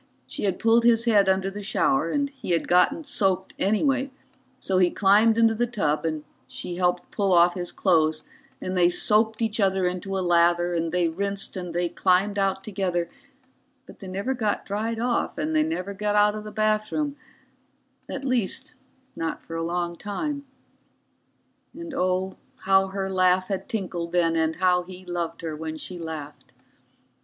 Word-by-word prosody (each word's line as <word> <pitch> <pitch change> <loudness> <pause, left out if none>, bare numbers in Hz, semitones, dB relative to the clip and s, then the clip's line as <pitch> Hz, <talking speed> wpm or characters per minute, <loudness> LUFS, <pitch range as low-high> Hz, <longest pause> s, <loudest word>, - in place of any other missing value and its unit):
She - - -4
had 190 -2 0
pulled 230 +1 +3
his 235 0 +4
head 205 -4 +4
under 190 0 +1
the 205 +1 -7
shower, 270 +7 +1
and 285 -1 -1
he 265 -10 -4
had 170 - 0
got 285 - +3
soaked 190 -8 +1
anyway, 265 +7 +1 0.5
so 190 -6 0
he 180 -1 +4
climbed 215 +4 +4
into 225 -1 +4
the 240 +2 0
tub 165 -10 -1
and 155 -2 -2 0.2
she 175 - -6
helped 180 -1 0
pull 195 -3 +2
off 175 +1 +5
his 175 -1 -4
clothes 155 -4 +2 0.4
and 185 - -4
they 175 -1 +4
soaped 220 +4 +2
each 220 0 -1
other 190 -2 +2
into 185 +2 -2
a 185 - -1
lather 175 0 +3
and 165 -1 -1
they 180 -1 +2
rinsed 200 +4 -2
and 180 -2 -6
they 175 0 +1
climbed 190 +3 +1
out 195 -1 0
together, 185 -4 -2 0.8
but - - -15
they 195 - -9
never 200 +8 -2
got 220 -5 -1
dried 220 +3 -2
off 240 +3 -1
and 310 +2 -2
they 310 - +4
never 305 - -2
got 210 +1 -1
out 210 0 +4
of 215 0 -7
the 210 - -7
bathroom 215 +8 0 0.9
at - - -5
least 245 -7 -1 0.4
not 165 -1 -4
for 165 - -8
a 165 - -2
long 170 +1 -2
time. 280 - -4 1.3
And 335 -2 -8
oh, 185 -3 -1 0.2
how 195 0 +3
her 190 0 -3
laugh 185 0 +2
had 195 -2 -3
tinkled 175 -5 -4
then, 165 -2 +2
and 160 0 +1
how 180 -1 +3
he 185 +1 -11
loved 170 -2 -4
her 160 -2 -4
when 160 0 -5
she 180 +2 -6
laughed. 155 -3 -8
190 Hz, 175 wpm, -25 LUFS, 175-215 Hz, 1.3 s, off